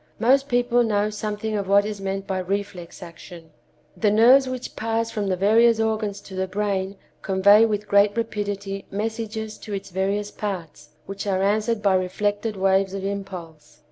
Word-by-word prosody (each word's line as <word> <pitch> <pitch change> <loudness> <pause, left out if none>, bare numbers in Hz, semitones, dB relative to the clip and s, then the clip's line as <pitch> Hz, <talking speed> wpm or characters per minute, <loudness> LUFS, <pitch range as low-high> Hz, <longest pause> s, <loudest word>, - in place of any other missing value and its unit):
Most 270 +5 +3
people 245 0 +2
know 210 -2 +1
something 210 +1 -3
of 200 -2 -2
what 200 +1 +4
is 210 -2 -5
meant 195 0 -3
by 190 -1 -2
reflex 185 -2 -5
action. 170 -1 -12 0.4
The 215 - +2
nerves 250 +5 +5
which 255 -1 -6
pass 225 0 -1
from 210 -2 -2
the 185 - +1
various 225 +4 +4
organs 220 -2 -1
to 195 - -13
the 190 0 -2
brain 195 0 -2 0.3
convey 200 +3 +5
with, 210 -1 -3
great 200 +1 +3
rapidity 205 -3 -3
messages 220 +1 -4
to 210 - -8
its 195 -1 -5
various 200 +3 -1
parts, 185 -9 -6 0.2
which 195 +1 -6
are 190 -1 +1
answered 215 +2 0
by 200 -2 +4
reflected 205 +3 -1
waves 195 0 +2
of 195 - -5
impulse. 185 -6 -7
205 Hz, 170 wpm, -23 LUFS, 195-220 Hz, 0.4 s, nerves